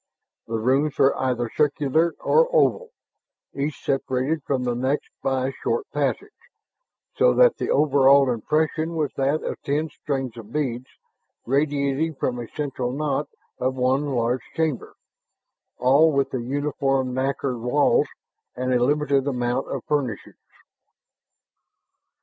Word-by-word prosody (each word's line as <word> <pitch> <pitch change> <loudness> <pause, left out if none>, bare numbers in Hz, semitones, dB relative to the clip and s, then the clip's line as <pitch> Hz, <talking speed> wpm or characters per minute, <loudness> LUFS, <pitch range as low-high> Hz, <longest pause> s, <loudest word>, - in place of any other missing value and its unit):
The 115 - -2
rooms 135 +6 +1
were 135 - +4
either 125 -2 -1
circular 150 +3 +1
or 485 +1 +3
oval, 485 -1 +2 0.6
each 140 +2 -4
separated 135 +3 0
from 135 -2 -1
the 125 -1 0
next 130 +4 -2
by 130 -1 0
a - - -7
short 455 -2 -1
passage, - - -2 0.8
so - - +4
that - - +5
the - - -3
overall 140 -1 +5
impression 155 +7 -1
was 150 -4 -1
that 140 +3 0
of - - -5
ten 150 +3 -1
strings 135 -5 -4
of 110 -1 -10
beads 130 -4 -2 0.6
radiating 140 +3 0
from 125 -2 -2
a 120 - -6
central 135 -4 -3
knot 145 +1 -2 0.3
of 130 +1 0
one 130 +3 +1
large 125 -1 0
chamber, 160 -6 -2 0.8
all 140 +6 +4
with 140 -1 0
the 130 - -2
uniform 135 0 -1
nacre 135 0 -1
walls 125 +5 +2 0.5
and 130 +1 -1
a 120 -1 +3
limited 145 0 +1
amount 125 -1 -1
of 135 -4 -4
furnishings. 135 -8 -3
135 Hz, 130 wpm, -23 LUFS, 130-150 Hz, 0.8 s, that